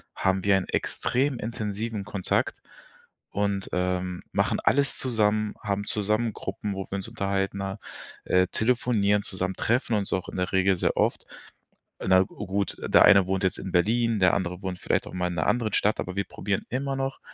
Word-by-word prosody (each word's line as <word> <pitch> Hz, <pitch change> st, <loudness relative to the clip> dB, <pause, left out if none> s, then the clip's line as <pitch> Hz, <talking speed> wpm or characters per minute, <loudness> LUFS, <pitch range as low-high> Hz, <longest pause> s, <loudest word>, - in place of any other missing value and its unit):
haben 95 Hz, 0 st, +1 dB
wir 100 Hz, -1 st, +5 dB
einen 95 Hz, -, -3 dB
extrem 135 Hz, +1 st, 0 dB
intensiven 110 Hz, -1 st, -3 dB
Kontakt 100 Hz, -2 st, -1 dB, 0.7 s
und, 100 Hz, -1 st, -1 dB
ähm, 90 Hz, 0 st, -1 dB
machen -, -, +1 dB
alles 140 Hz, 0 st, +2 dB
zusammen, 110 Hz, -4 st, +1 dB
haben 100 Hz, -1 st, -2 dB
zusammen 110 Hz, +2 st, 0 dB
Gruppen, 100 Hz, +1 st, -4 dB
wo 95 Hz, 0 st, -4 dB
wir 100 Hz, -, -1 dB
uns 95 Hz, -, -4 dB
unterhalten, 100 Hz, -3 st, -1 dB
ne? 100 Hz, +1 st, -4 dB, 0.5 s
Äh, 90 Hz, 0 st, +4 dB
telefonieren, 110 Hz, -3 st, +1 dB
zusammen 95 Hz, -1 st, -3 dB
treffen 120 Hz, 0 st, +1 dB
uns 100 Hz, -2 st, -1 dB
auch 95 Hz, -, -2 dB
in -, -, -7 dB
der 90 Hz, 0 st, -1 dB
Regel 95 Hz, 0 st, +3 dB
sehr -, -, 0 dB
oft. -, -, +1 dB, 0.8 s
Na 95 Hz, 0 st, +4 dB
gut, 100 Hz, +1 st, -3 dB
der -, -, +5 dB
eine 100 Hz, -2 st, +7 dB
wohnt 95 Hz, +1 st, -1 dB
jetzt 95 Hz, -, 0 dB
in 95 Hz, -, -6 dB
Berlin, 115 Hz, +5 st, +2 dB
der 90 Hz, -2 st, +5 dB
andere 90 Hz, -2 st, -2 dB
wohnt 95 Hz, -1 st, -4 dB
vielleicht -, -, 0 dB
auch -, -, -11 dB
mal 90 Hz, -1 st, 0 dB
in 90 Hz, -, -4 dB
'ner 80 Hz, -, +1 dB
anderen 115 Hz, -4 st, +1 dB
Stadt, 105 Hz, -, +2 dB
aber 90 Hz, -, -5 dB
wir 100 Hz, -, 0 dB
probieren 100 Hz, 0 st, -3 dB
immer 135 Hz, +2 st, -1 dB
noch, 135 Hz, 0 st, -3 dB
100 Hz, 185 wpm, -26 LUFS, 95-110 Hz, 0.8 s, eine